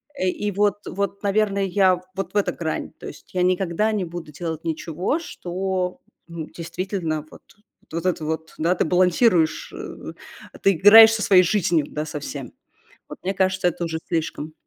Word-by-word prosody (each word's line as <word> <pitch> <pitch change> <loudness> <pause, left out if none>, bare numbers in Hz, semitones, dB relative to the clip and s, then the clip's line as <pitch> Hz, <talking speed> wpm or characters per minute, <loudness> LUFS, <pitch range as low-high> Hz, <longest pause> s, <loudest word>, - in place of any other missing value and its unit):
Э, 185 - -1
и 205 +3 -1
вот 205 0 +1
вот, 200 +1 -3
наверное, 200 -1 +1
я 185 -1 +3
вот 195 0 -4
в - - 0
эта 205 - +2
грань. 160 -2 -4
То - - -8
есть - - -12
я 180 - 0
никогда 185 +3 +1
не 200 -4 -1
буду 170 -2 -8
делать 160 +1 -5
ничего, 165 - -2
что, 185 - -3 0.3
м, 165 -2 -6
действительно 170 -2 -4
вот - - -14 0.5
этот 170 +1 -1
вот, 160 +1 -4
да, 170 +3 +1
ты - - +1
балансируешь, 180 0 +2
э, - - -8 0.5
ты 195 - +5
играешь 220 +5 +9
со 225 - -1
своей 185 -3 +6
жизнью, 175 -5 +1
да, 150 +1 -4
со 150 -1 -5
всем. 140 -1 -7 0.6
Вот - - -9
мне 190 +2 -2
кажется, 190 -1 +1
это 175 0 -3
уже 165 -1 -3
слишком. 160 -2 -3
180 Hz, 170 wpm, -23 LUFS, 165-195 Hz, 0.6 s, играешь